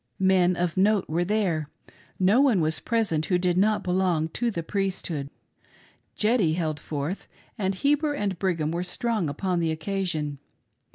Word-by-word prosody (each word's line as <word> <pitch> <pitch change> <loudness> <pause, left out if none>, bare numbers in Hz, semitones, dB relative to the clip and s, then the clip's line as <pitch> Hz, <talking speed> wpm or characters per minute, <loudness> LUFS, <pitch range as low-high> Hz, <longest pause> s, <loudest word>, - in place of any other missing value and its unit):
Men 185 -1 +3
of 175 0 -1
note 205 +1 +3
were 165 +3 0
there 175 -7 0 0.2
— - - -29
no 195 +7 +4
one 255 -9 +4
was 160 -1 +1
present 210 -10 0
who 180 - +2
did 180 -1 +1
not 210 +3 +2
belong 180 -3 +1
to 240 +8 -1
the 170 -7 -3
Priesthood. 180 -7 -2 0.9
"Jeddy" 210 -7 +2
held 160 -3 -2
forth, 150 +6 -4 0.3
and 195 -2 -1
Heber 295 +6 +1
and 200 -8 -2
Brigham 165 -5 0
were 170 +1 -2
strong 210 -1 -1
upon 180 +5 -1
the 165 -1 +1
occasion. 160 -3 -2
180 Hz, 160 wpm, -26 LUFS, 160-205 Hz, 0.9 s, no